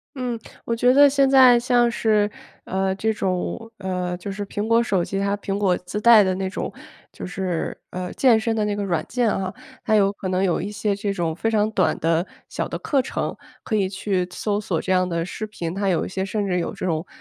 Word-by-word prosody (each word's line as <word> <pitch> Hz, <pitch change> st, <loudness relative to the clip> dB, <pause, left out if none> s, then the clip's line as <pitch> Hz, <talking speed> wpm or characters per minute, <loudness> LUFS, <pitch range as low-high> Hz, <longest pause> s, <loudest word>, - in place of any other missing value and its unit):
嗯， 250 Hz, -3 st, -3 dB, 0.3 s
我 230 Hz, -, -1 dB
觉 245 Hz, +2 st, +4 dB
得 285 Hz, +2 st, +7 dB
现 275 Hz, -1 st, +3 dB
在 255 Hz, -3 st, +7 dB
像 240 Hz, 0 st, +3 dB
是， 215 Hz, -3 st, +2 dB, 0.4 s
呃， 190 Hz, 0 st, -1 dB
这 220 Hz, +3 st, 0 dB
种， 195 Hz, +3 st, -3 dB
呃 180 Hz, -2 st, -3 dB
就 190 Hz, +3 st, -6 dB
是 205 Hz, +1 st, -4 dB
苹 205 Hz, +1 st, -3 dB
果 230 Hz, +1 st, +4 dB
手 195 Hz, -6 st, 0 dB
机， 195 Hz, -, -3 dB
它 200 Hz, +1 st, 0 dB
苹 200 Hz, -1 st, -3 dB
果 190 Hz, -3 st, +2 dB
自 180 Hz, +4 st, -5 dB
带 225 Hz, -2 st, +7 dB
的 185 Hz, -1 st, +1 dB
那 190 Hz, 0 st, -2 dB
种， -, -, -4 dB, 0.4 s
就 -, -, -8 dB
是， 180 Hz, -2 st, -3 dB
呃， 180 Hz, 0 st, -5 dB
健 240 Hz, -5 st, +4 dB
身 225 Hz, 0 st, -1 dB
的 215 Hz, -, +1 dB
那 210 Hz, 0 st, -1 dB
个 205 Hz, -, -3 dB
软 175 Hz, -5 st, -1 dB
件 240 Hz, -2 st, +1 dB
啊， 190 Hz, -2 st, -2 dB, 0.3 s
它 220 Hz, -, +2 dB
有 200 Hz, -2 st, +4 dB
可 195 Hz, -2 st, -6 dB
能 185 Hz, 0 st, 0 dB
有 180 Hz, -3 st, +1 dB
一 205 Hz, +3 st, -4 dB
些 210 Hz, -1 st, -1 dB
这 200 Hz, 0 st, -2 dB
种 170 Hz, -4 st, -2 dB
非 225 Hz, +5 st, 0 dB
常 215 Hz, -1 st, +2 dB
短 195 Hz, -4 st, +1 dB
的， 165 Hz, +2 st, +1 dB, 0.2 s
小 -, -, -3 dB
的 -, -, -5 dB
课 280 Hz, -, +1 dB
程， -, -, -3 dB, 0.3 s
可 220 Hz, -, -1 dB
以 195 Hz, -3 st, +1 dB
去 190 Hz, -1 st, -1 dB
搜 205 Hz, +1 st, -1 dB
索 180 Hz, -6 st, -2 dB
这 -, -, -5 dB
样 185 Hz, 0 st, +3 dB
的 170 Hz, -1 st, -1 dB
视 215 Hz, -, -5 dB
频， 175 Hz, -5 st, -5 dB
它 200 Hz, 0 st, -1 dB
有 175 Hz, -3 st, +1 dB
一 -, -, -5 dB
些 190 Hz, 0 st, -3 dB
甚 205 Hz, +1 st, -2 dB
至 180 Hz, -2 st, 0 dB
有 170 Hz, -, -2 dB
这 -, -, -6 dB
种， 165 Hz, -1 st, -1 dB
200 Hz, 255 characters per minute, -23 LUFS, 185-220 Hz, 0.4 s, 得